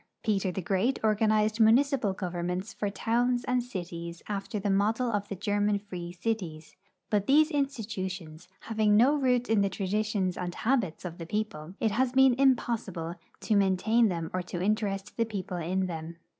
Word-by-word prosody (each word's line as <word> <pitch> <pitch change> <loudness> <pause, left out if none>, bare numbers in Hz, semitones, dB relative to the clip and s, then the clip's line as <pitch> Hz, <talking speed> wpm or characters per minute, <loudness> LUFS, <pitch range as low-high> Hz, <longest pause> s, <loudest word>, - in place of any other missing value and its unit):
Peter 195 -3 +1
tlie 185 +1 -4
Great 205 +7 +1
organized 215 0 +2
municipal 240 0 +4
governments 180 +1 -3
for 205 - -2
towns 240 +4 0
and 250 0 +1
cities 170 -7 -6
after 205 +2 -3
the 205 0 -2
model 220 +5 +1
of 205 -2 -1
the 200 - -5
German 205 +1 +1
free 180 -4 -7
cities, 175 -5 -4 0.4
but 205 -2 +1
these 305 +4 +5
institutions 190 - -3
having 215 -2 +2
no 255 +6 +5
root 250 -3 +1
in 220 -2 +3
the 200 - +2
traditions 195 -1 -1
and 175 -1 -4
habits 220 -10 0
of 170 -1 -6
tlie 165 0 -7
people, 195 -6 -3
it 220 - +1
has 250 +4 +1
been 265 -1 +6
impossil)le 225 -10 0 0.2
to 215 - +1
maintain 200 +4 +3
them 170 -4 -3
or 185 - 0
.to 175 0 -6
interest 200 0 -1
the 230 - +3
people 195 -4 -5
in 185 +3 -1
them. 165 -1 -6
205 Hz, 170 wpm, -29 LUFS, 180-225 Hz, 0.4 s, been